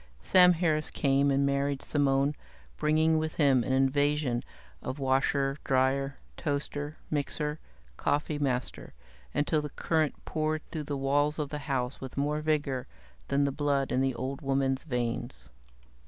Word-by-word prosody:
Sam 180 -1 +7
Harris 160 -3 0
came 140 0 +2
and 140 0 +2
married 140 0 0
Simone, 140 0 +2 0.4
bringing 155 - +3
with 155 0 -3
him 135 -5 +4
an - - -2
invasion 135 -1 +2 0.4
of 130 - -4
washer, 135 +1 +1
dryer, 135 +1 +1 0.2
toaster, 145 0 -3
mixer, 150 +1 -2 0.4
coffeemaster, 145 -4 -1 0.4
until 150 +1 +1
the 150 - -5
current 155 +1 -1
poured 155 0 -1
through 155 -2 -4
the 145 -1 -3
walls 145 +2 +1
of 150 -3 -2
the 150 - -4
house 125 -1 -1
with 130 0 -8
more 150 +2 0
vigor 145 -4 0 0.4
than 140 +1 +2
the 140 - +1
blood 140 -1 0
in 130 - +2
the 135 -2 +1
old 135 +4 -4
woman's 135 -1 0
veins. 120 -2 -3
140 Hz, 140 wpm, -29 LUFS, 135-150 Hz, 0.4 s, Sam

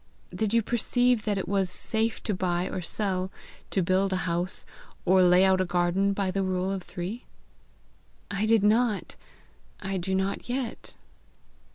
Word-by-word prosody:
Did 215 -2 -1
you 230 0 +3
perceive 245 0 +1
that 205 -2 0
it 190 - -3
was 195 -1 +1
safe 220 +4 -1
to 215 - -1
buy 180 -1 0
or 185 - -4
sell, 190 +1 -1 0.4
to 190 - +1
build 190 +2 +2
a - - +1
house, 175 +1 -2 0.4
or 185 +1 +5
lay 180 +1 +6
out 190 -1 +4
a - - +1
garden, 180 +3 +1
by 195 -1 -1
the 195 +1 -1
rule 185 0 -1
of 195 -1 -3
three?" 185 +7 -6 1.1
"I 200 +2 0
did 225 -2 +4
not. 215 0 +2 0.6
I 195 -1 -3
do 190 +1 -1
not 190 +4 -2
yet." 250 -2 -4
195 Hz, 165 wpm, -27 LUFS, 185-215 Hz, 1.1 s, lay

